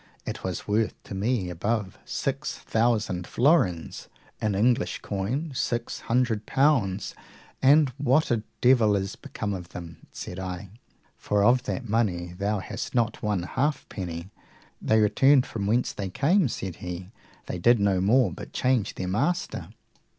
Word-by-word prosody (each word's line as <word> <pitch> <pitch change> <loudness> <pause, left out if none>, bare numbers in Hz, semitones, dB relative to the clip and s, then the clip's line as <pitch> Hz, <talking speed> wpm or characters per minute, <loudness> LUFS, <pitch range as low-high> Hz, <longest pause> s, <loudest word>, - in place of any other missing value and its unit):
It - - -5
was - - -4
worth 105 +1 +1
to - - -9
me 100 -2 0
above 100 +3 -2
six 140 +2 -3
thousand 110 -6 0
florins, 120 - +1 0.3
in 105 -2 0
English 120 +4 +1
coin 120 +11 -2
six 120 -2 -2
hundred 115 -3 0
pounds. 120 -9 +2 0.5
And 145 +2 +6
what 140 +2 +3
a 115 -2 +2 0.2
devil 120 -5 +5
is 95 0 -2
become 105 -2 -5
of 90 -2 -6
them? 85 -2 -10
said 90 - -7
I; 90 0 -5 0.5
for 100 -1 +1
of 125 +3 +4
that 130 -3 -3
money 95 -6 0
thou 100 +3 0
hast - - -6
not 115 -2 +1
one 105 -4 0
halfpenny. 95 - -3 0.5
They 110 - +3
returned 125 +6 +5
from 100 -3 -4
whence 120 +4 +1
they 100 -2 -4
came, 155 - +3
said 95 -6 -5
he; 90 +2 -7 0.3
they 90 - -4
did 120 +5 +5
no 100 -2 +2
more 110 +1 +4
but - - -9
change 125 -5 +1
their 90 - -3
master. 145 - -1
110 Hz, 150 wpm, -26 LUFS, 95-125 Hz, 0.5 s, And